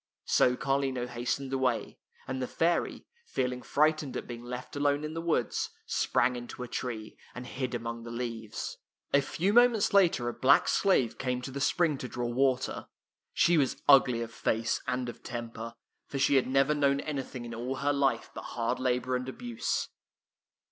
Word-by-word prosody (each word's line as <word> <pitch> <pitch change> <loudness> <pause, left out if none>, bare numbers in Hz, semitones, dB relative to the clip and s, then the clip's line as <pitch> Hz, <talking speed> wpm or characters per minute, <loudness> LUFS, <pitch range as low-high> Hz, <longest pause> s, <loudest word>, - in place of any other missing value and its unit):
So 125 - +4
Carlino 135 -2 0
hastened 125 +3 -3
away, 130 -3 0 0.3
and 130 -1 -3
the 125 - -1
fairy, 170 +1 0 0.2
feeling 125 -1 -1
frightened 155 -1 +1
at - - -5
being 120 -1 -7
left 125 +2 -7
alone 145 +1 +1
in 155 +1 -4
the 165 - -3
woods, 165 -8 0 0.2
sprang 125 +1 +1
into 120 +1 -7
a - - -6
tree, 115 -3 -5 0.2
and 125 0 -6
hid 125 0 -3
among 115 0 -4
the 115 - -8
leaves. 115 -2 -5 0.3
A 140 - +6
few 180 +8 0
moments 235 -3 +5
later 175 -11 +4
a 120 - -1
black 140 +4 +4
slave 185 - +2
came 125 -1 -1
to 135 - -5
the 140 +1 -5
spring 155 -1 +2
to 125 - -4
draw 120 -1 -3
water. 130 +1 0 0.4
She 170 -2 +4
was 135 -3 0
ugly 135 -4 +6
of 115 - -8
face 115 0 0
and 125 -1 -1
of 120 - -8
temper, 115 -2 -6 0.3
for 140 - -4
she 135 - +3
had 135 -2 +4
never 135 +3 +3
known 140 -1 +2
anything 135 -4 -5
in 115 - -7
all 120 +3 -3
her 145 +2 +1
life 135 -4 +1
but - - -6
hard 115 -1 0
labor 125 0 0
and 125 +1 -3
abuse. 235 - -2
130 Hz, 180 wpm, -30 LUFS, 120-140 Hz, 0.4 s, A